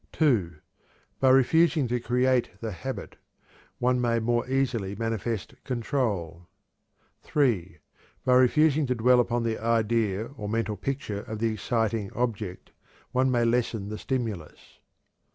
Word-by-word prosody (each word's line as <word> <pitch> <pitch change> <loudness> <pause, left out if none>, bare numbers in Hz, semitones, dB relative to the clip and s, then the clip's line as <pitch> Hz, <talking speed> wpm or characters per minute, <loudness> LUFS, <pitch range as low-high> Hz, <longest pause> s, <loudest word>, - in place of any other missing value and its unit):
(2) 110 - +2 0.6
By 135 - +4
refusing 145 +2 +4
to 120 +1 -1
create 125 +1 +1
the 115 -1 -4
habit, 130 +7 -6 0.6
one 125 0 +1
may 120 -1 +1
more 120 +2 0
easily 120 -7 0
manifest 115 0 -3
control. 110 - -2 0.7
(3) 105 - 0 0.5
By 130 - +4
refusing 145 +3 +4
to 125 - 0
dwell 125 +2 +4
upon 120 0 +1
the 115 -1 -1
idea 115 -2 +1
or 105 -1 -5
mental 110 -1 -1
picture 110 -2 -3
of 110 - -6
the 110 0 0
exciting 110 -2 -1
object, 110 -6 -3 0.4
one 130 +1 +2
may 120 -2 +2
lessen 115 -3 0
the 110 - -5
stimulus. 110 - -5
115 Hz, 130 wpm, -27 LUFS, 110-125 Hz, 0.7 s, By